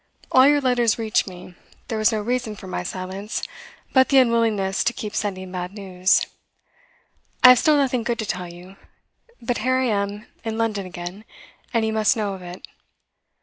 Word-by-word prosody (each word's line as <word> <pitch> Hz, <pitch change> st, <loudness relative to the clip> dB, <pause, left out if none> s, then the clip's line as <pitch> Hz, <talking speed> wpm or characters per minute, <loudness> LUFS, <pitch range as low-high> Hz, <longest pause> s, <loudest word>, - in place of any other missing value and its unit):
All 260 Hz, +1 st, +7 dB
your 290 Hz, 0 st, +4 dB
letters 245 Hz, -4 st, +2 dB
reached 220 Hz, -2 st, 0 dB
me; 180 Hz, -1 st, -10 dB, 0.3 s
there 225 Hz, -, -3 dB
was 215 Hz, +2 st, +4 dB
no 215 Hz, -1 st, -1 dB
reason 240 Hz, -1 st, -2 dB
for 190 Hz, -, -11 dB
my 185 Hz, -, -4 dB
silence 185 Hz, +3 st, -5 dB, 0.5 s
but 260 Hz, -1 st, +5 dB
the 275 Hz, -, +4 dB
unwillingness 225 Hz, -6 st, +2 dB
to 240 Hz, -, +1 dB
keep 210 Hz, -2 st, -6 dB
sending 190 Hz, -3 st, -3 dB
bad 180 Hz, 0 st, -5 dB
news. 185 Hz, -2 st, +1 dB, 1.2 s
I 250 Hz, -, +11 dB
have 250 Hz, -1 st, +8 dB
still 305 Hz, -1 st, +4 dB
nothing 260 Hz, -3 st, +1 dB
good 235 Hz, +1 st, -2 dB
to 220 Hz, -, -3 dB
tell 180 Hz, -3 st, -4 dB
you, 180 Hz, +3 st, -13 dB, 0.7 s
but 240 Hz, +1 st, -1 dB
here 255 Hz, +3 st, +1 dB
I 260 Hz, -, +1 dB
am 205 Hz, -1 st, -2 dB, 0.2 s
in 225 Hz, -1 st, -3 dB
London 215 Hz, -4 st, -1 dB
again, 175 Hz, +3 st, -8 dB, 0.5 s
and 230 Hz, -2 st, +1 dB
you 220 Hz, -, -1 dB
must 220 Hz, +1 st, +2 dB
know 205 Hz, -2 st, -1 dB
of 190 Hz, -, -9 dB
it. 180 Hz, 0 st, -9 dB
215 Hz, 185 wpm, -22 LUFS, 190-235 Hz, 1.2 s, I